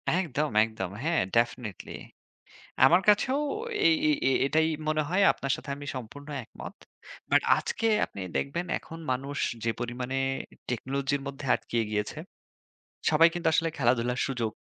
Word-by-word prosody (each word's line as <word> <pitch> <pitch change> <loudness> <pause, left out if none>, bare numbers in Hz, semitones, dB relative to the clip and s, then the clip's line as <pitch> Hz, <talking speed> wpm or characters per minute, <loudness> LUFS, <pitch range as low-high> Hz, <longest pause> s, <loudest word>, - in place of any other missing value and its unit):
একদম, 155 -5 0
একদম। 110 -5 -4
হ্যাঁ, 165 +1 +2
ডেফিনিটলি 115 -3 -1 0.9
আমার 175 +6 +6
কাছেও 260 +7 +3 0.5
এ - - +9 0.2
এই 305 - +4
এই 135 - +3
এটাই 160 +3 +3 0.2
মনে 155 0 +2
হয়, 190 +3 +3
আপনার 135 - -3
সাথে - - -10
আমি 145 0 -9
সম্পূর্ণ 130 +4 -8 0.2
একমত। - - -10 0.6
বাট - - +6 0.2
আজকে 225 - -1 0.2
আপনি - - -11 0.2
দেখবেন 170 +6 -2
এখন 165 - -10
মানুষ 135 +3 -3 0.3
যে 115 - +1
পরিমাণে 125 +2 -3 0.5
টেকনোলজির 135 +3 -1
মধ্যে 140 +1 -7
আটকিয়ে 115 -1 -2
গিয়েছে, 105 +6 -2 0.9
সবাই 160 +1 +6
কিন্তু 175 -1 -2
আসলে 165 +1 +2
খেলাধুলার 125 -1 +1
সুযোগ 120 -5 -2
140 Hz, 140 wpm, -28 LUFS, 120-160 Hz, 0.9 s, এ